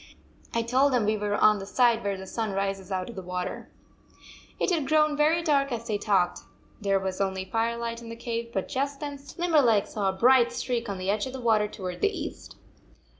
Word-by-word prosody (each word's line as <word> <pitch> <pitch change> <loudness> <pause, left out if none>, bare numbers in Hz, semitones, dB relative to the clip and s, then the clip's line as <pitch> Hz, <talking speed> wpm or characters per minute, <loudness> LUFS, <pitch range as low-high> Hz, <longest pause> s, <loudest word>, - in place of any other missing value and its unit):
I 230 - 0
told 260 +4 +3
them 240 -4 +2
we 215 +1 +2
were 205 -1 -1
on 210 0 +4
the 195 - -6
side 235 0 +3
where 200 -1 -1
the 190 - -8
sun 220 +1 -3
rises 195 0 -2
out 185 -1 -2
of 235 - -9
the 190 - -5
water." 180 0 -5 0.9
It - - +1
had 310 -6 0
grown 305 -1 +3
very 315 +3 +3
dark 280 -4 +2
as 230 -1 -3
they 215 -3 -1
talked. 190 - +1 0.4
There 195 -1 +2
was 190 0 -3
only 190 -1 -1
firelight 230 +2 -2
in 230 - -9
the 230 - -6
cave, 235 0 -4
but 190 -4 -2
just 275 +1 -2
then 285 -2 -5 0.2
Limberleg 290 - +3
saw 200 -3 -1
a - - -1
bright 240 +4 +5
streak 240 -2 -2
on 200 - -3
the 185 +1 -1
edge 210 +3 -1
of 260 - -7
the 265 - -5
water 220 -3 +2
toward 185 -3 -6
the 410 - +4
east. 415 - -7
230 Hz, 220 wpm, -27 LUFS, 195-260 Hz, 0.9 s, bright